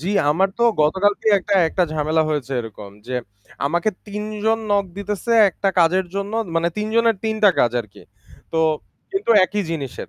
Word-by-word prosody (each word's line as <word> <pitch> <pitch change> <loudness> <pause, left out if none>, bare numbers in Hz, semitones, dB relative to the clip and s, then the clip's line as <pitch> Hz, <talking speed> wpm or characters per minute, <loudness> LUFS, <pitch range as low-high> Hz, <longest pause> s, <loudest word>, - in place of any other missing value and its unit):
জ্বী, 185 +6 -2 0.2
আমার 190 +6 +2
তো - - 0 0.2
গতকালকেই 200 +7 +2 0.4
একটা 180 - 0
ঝামেলা 155 +1 +1
হয়েছে 145 -3 -2
এরকম 105 -3 -10 0.2
যে 130 - -4 0.5
আমাকে 170 +8 0 0.2
৩ 210 0 -5 0.2
জন 225 0 +2
নক 200 -1 +2
দিতেছে 205 +3 -3 0.2
একটা 195 +3 -2
কাজের 180 +3 +3
জন্য 200 +1 -3 0.2
মানে 165 +1 +2
৩জনের 225 +1 +1
৩ 220 0 0
টা 205 - +8
কাজ 120 - +2
আরকি। 105 -4 -13 0.5
তো 160 - +1 0.5
কিন্তু 390 -10 -2
একই 205 +2 -2
জিনিসের। 140 -6 -5
190 Hz, 160 wpm, -21 LUFS, 155-210 Hz, 0.5 s, টা